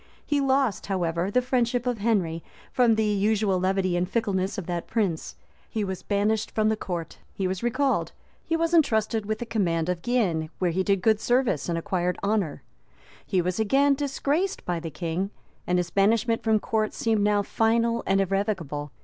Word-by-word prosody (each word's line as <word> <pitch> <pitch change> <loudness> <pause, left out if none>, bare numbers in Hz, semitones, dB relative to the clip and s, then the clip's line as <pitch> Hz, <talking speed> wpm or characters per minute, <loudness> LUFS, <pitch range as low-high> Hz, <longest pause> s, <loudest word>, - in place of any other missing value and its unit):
He 290 -1 +1
lost, 265 -5 +1
however, 175 -2 -1
the 250 +4 +2
friendship 245 -1 0
of 245 -3 -1
Henry 190 -7 0 0.3
from 240 -3 +4
the 220 0 +1
usual 205 -1 +1
levity 185 -1 +1
and 175 +1 0
fickleness 195 -4 -1
of 195 - -4
that 175 -1 -3
prince; 195 -8 -1 0.3
he 220 - -2
was 190 -2 -4
banished 210 +2 0
the 215 0 +2
court; 175 -6 -5 0.2
he 190 - -1
was 185 0 -3
recalled; 260 +3 0 0.3
he 330 - -1
was 330 +1 0
intrusted 220 -8 +2
with 215 0 -1
the 240 - -5
command 175 -7 0
of 180 -1 -1
Guienne,[] 180 -10 0
where 180 -2 +1
he 185 +3 0
did 195 -1 +1
good 220 -1 +4
service 240 - +1
and 170 - 0
acquired 180 0 -1
honor; 200 -7 -1 0.6
he 185 -2 +1
was 180 +3 -2
again 275 +6 +3
disgraced 290 +6 -1
by 175 -1 -1
the 165 0 -5
king, 170 +4 -3 0.4
and 180 - +2
his 175 -1 -1
banishment 225 +4 +2
from 220 -1 +2
court 215 0 -1
seemed 225 -2 +1
now 205 0 +2
final 230 +2 +1
and 195 0 +3
irrevocable. 185 -7 -2
205 Hz, 180 wpm, -26 LUFS, 180-230 Hz, 0.6 s, from